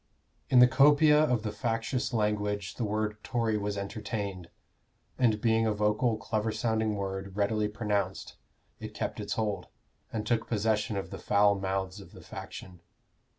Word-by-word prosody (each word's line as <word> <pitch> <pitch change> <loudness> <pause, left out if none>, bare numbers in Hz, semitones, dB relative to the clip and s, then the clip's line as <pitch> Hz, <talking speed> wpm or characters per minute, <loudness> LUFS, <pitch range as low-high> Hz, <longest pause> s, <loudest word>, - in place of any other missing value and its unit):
"In 130 - +4
the 125 0 +9
copia 150 +3 +6
of 125 -8 +1
the 110 - -2
factious 115 +4 -2
language 105 -3 -1
the 120 - -4
word 105 0 -2
Tory 115 -3 0
was 105 -1 -2
entertained, 100 -3 -4 0.7
and 115 -4 +3
being 115 0 +2
a 110 - +2
vocal 105 +3 +1
clever 110 0 -1
sounding 110 -2 0
word, 95 0 -4
readily 105 +1 +1
pronounced, 105 -1 -2 0.4
it - - -8
kept - - -3
its - - -3
hold, 105 -4 -2 0.4
and 110 -2 -3
took 115 -1 0
possession 110 -1 0
of 95 - -5
the 95 - -6
foul 100 +3 +4
mouths 95 0 -3
of 100 - -13
the - - -12
faction. 90 -2 -9
105 Hz, 155 wpm, -29 LUFS, 100-115 Hz, 0.7 s, the